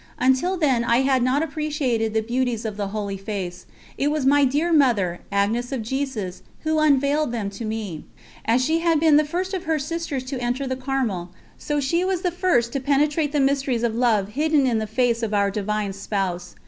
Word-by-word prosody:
Until 265 +9 +2
then 270 -8 +2
I 235 +2 +3
had 265 -1 +2
not 255 +5 +2
appreciated 285 -8 -1
the 220 - +2
beauties 240 -1 -1
of 215 -2 -3
the 205 -1 -3
Holy 200 -1 -4
Face; 190 -3 -5 0.3
it 285 - +2
was 300 -2 -1
my 285 +1 +5
dear 300 +6 +1
Mother, 215 - +3
Agnes 220 +5 0
of 260 -5 -2
Jesus, 230 -7 -3 0.2
who 315 0 +1
unveiled 290 -1 +2
them 215 -4 -3
to 225 +3 -6
me. 215 -8 -4 0.4
As 245 +3 +2
she 320 +3 +2
had 330 -2 +2
been 310 -2 +5
the 305 - +4
first 360 +6 -3
of 370 -2 -3
her 320 -1 +1
sisters 300 -2 -3
to 260 -1 -5
enter 245 +3 -1
the 260 0 -2
Carmel, 255 -9 -2 0.3
so 295 -1 -1
she 335 +6 +1
was 375 -1 -1
the 360 - +1
first 340 -10 +1
to 275 - 0
penetrate 290 +2 +1
the 295 - +1
mysteries 270 -3 +1
of 235 -2 +1
love 220 -4 +2
hidden 295 +3 +2
in 235 -3 +1
the 215 - -3
Face 235 +1 +1
of 215 -2 -1
Our 200 -1 +2
Divine 210 0 -2
Spouse. 190 -3 -3
255 Hz, 205 wpm, -23 LUFS, 220-295 Hz, 0.4 s, my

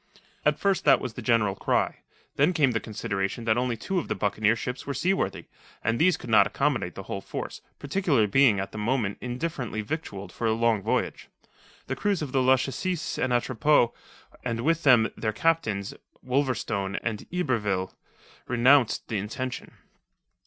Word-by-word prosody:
At - - +2
first 195 -2 +1
that - - +6
was 125 - -5
the - - -7
general 110 -3 +2
cry. - - 0 0.4
Then 150 +6 +3
came 145 -6 +3
the 115 - 0
consideration 105 0 -3
that 110 -1 +3
only 120 -1 0
two 190 - -1
of - - -5
the - - -1
buccaneer 105 +2 +1
ships 125 +4 -5
were 140 - -2
seaworthy 185 +9 0 0.4
and 115 +2 0
these 180 +2 +4
could - - -10
not 110 - +6
accommodate - - -1
the - - -7
whole - - -5
force, - - -6 0.2
particularly 145 - +1
being 110 -1 +4
at 95 - -4
the 110 - -6
moment 110 -2 -1
indifferently 125 -3 -3
victualled 105 -6 -5
for 115 - -2
a 110 - +3
long 115 -2 +2
voyage. - - -2 0.6
The - - -3
crews 200 -6 0
of 140 - -5
the 135 - +2
Lachesis 135 +7 0
and 130 - 0
Atropos 120 +1 +3 0.5
and 115 -2 -2
with 165 +4 +1
them 125 -6 +5
their 110 -1 -2
captains, 110 -9 0 0.3
Wolverstone 125 -7 -1
and 110 -3 -3
Yberville, 105 - -1 0.5
renounced 125 0 +3
the 110 - -2
intention. 125 +5 -5
120 Hz, 165 wpm, -26 LUFS, 110-140 Hz, 0.6 s, that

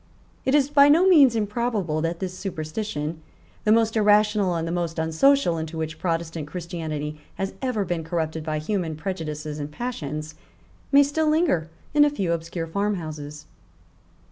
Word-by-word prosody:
It 265 - +3
is 280 -2 +4
by 285 -1 +7
no 335 +6 +5
means 285 -10 +6
improbable 210 -7 -1
that 165 +1 -1
this 185 +1 -4
superstition, 160 -3 -4 0.4
the 210 - +4
most 225 0 +3
irrational 210 -3 +3
and 165 0 -2
the - - -2
most 170 -1 -2
unsocial 165 - +3
into 160 +1 -5
which 160 0 -4
Protestant 165 -3 -2
Christianity 155 -3 -5 0.2
has 195 0 -3
ever 250 -7 -1
been 175 -2 -2
corrupted 160 -1 -2
by 155 -1 -2
human 165 0 -2
prejudices 155 -3 -5
and 145 0 -5
passions, 155 - -5 0.6
may 285 0 +7
still 305 +2 0
linger 305 - +2 0.2
in 295 0 +6
a 295 - +5
few 195 -12 -1
obscure 165 0 -4
farmhouses. 155 -6 -4
170 Hz, 155 wpm, -24 LUFS, 160-220 Hz, 0.6 s, by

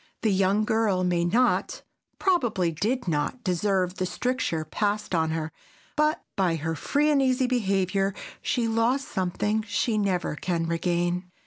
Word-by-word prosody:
The 220 - +3
young 195 +3 +2
girl 210 -4 +1
may 175 -1 +1
not, 240 +8 +1 0.3
probably 240 - +1
did 220 - -1
not, 165 +10 -1
deserve 185 0 0
the 185 - -1
stricture 180 -10 -1
passed 210 +3 -1
on 160 -2 +2
her, 160 0 -3 0.4
but 305 +1 +1
by 180 -4 +2
her 160 +1 -2
free 290 - +1
and 285 -2 +3
easy 260 -1 +2
behavior 195 -5 0 0.3
she 240 -2 0
lost 230 +5 +1
something 200 +4 -1
she 215 +1 0
never 185 -6 0
can 170 +1 -1
regain. 175 +2 -1
195 Hz, 145 wpm, -26 LUFS, 175-230 Hz, 0.4 s, The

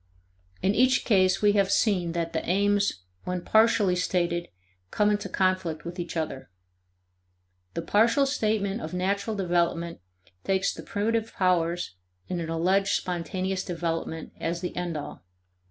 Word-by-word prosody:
In 195 +2 +3
each 255 +4 +3
case 185 -4 +3
we 205 - +6
have 200 -1 +2
seen 180 -6 +2
that 170 -1 -2
the - - -1
aims 200 - +2 0.2
when 180 -1 -3
partially 220 -4 +4
stated 175 -1 0 0.4
come 210 - +2
into 205 -1 -1
conflict 185 -4 0
with 175 +2 -6
each 170 -1 -4
other. 155 -4 -4 1.3
The 165 - -2
partial 230 +9 +3
statement 215 -5 0
of - - -5
natural 200 +4 -1
development 170 - 0 0.4
takes 195 0 +1
the - - -8
primitive 225 +2 -1
powers 175 - +1 0.3
in 180 - -2
an 165 -1 -4
alleged 190 +5 +2
spontaneous 185 +2 -2
development 165 -2 -3
as 170 +1 -2
the 180 - -4
end 175 -3 -2
all. 145 - -7
185 Hz, 140 wpm, -27 LUFS, 170-205 Hz, 1.3 s, we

